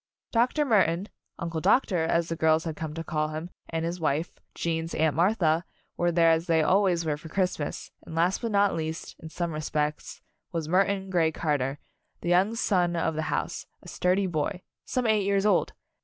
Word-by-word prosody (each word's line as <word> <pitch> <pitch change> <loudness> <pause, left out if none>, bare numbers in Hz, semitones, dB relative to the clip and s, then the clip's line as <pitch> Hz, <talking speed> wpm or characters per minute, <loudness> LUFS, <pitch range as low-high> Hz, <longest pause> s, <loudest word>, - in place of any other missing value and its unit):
Dr. 250 +6 +2
Murton 195 - +2 0.3
Uncle 165 -1 -3
Doctor, 180 - +3
as 170 0 +1
the 165 - -2
girls 160 0 +3
had 160 -2 -4
come 155 -1 -5
to 165 - -4
call 155 -1 -1
him 155 +3 -6 0.2
and 165 0 -2
his 170 +2 -3
wife, 155 +1 -1 0.2
Gene's 165 0 -2
Aunt 160 -2 +2
Martha, 170 -2 +2 0.3
were 175 0 +1
there 165 -1 +5
as 165 +1 +1
they 165 -2 +3
always 185 -1 +3
were 150 -2 0
for 160 +1 -11
Christmas, 180 -4 -2
and 160 - -9
last 175 +4 +2
but 230 - -1
not 200 -1 +3
least, 160 0 -4
in 160 - -9
some 170 +1 -3
respects, 150 -1 -3 0.3
was 165 -3 -3
Murton 190 +2 +1
Grey 165 -3 +3
Car 150 -2 0
ter, 135 +2 -2 0.4
the 175 - -2
young 190 +6 +3
son 180 -6 +1
of 165 -1 0
the 155 - -2
house, - - -2 0.2
a - - -13
sturdy 185 +2 +1
boy 175 +1 -2 0.2
some 255 -1 -1
eight 215 -2 +3
years 200 0 +1
old. 210 - +2
170 Hz, 195 wpm, -27 LUFS, 160-190 Hz, 0.4 s, there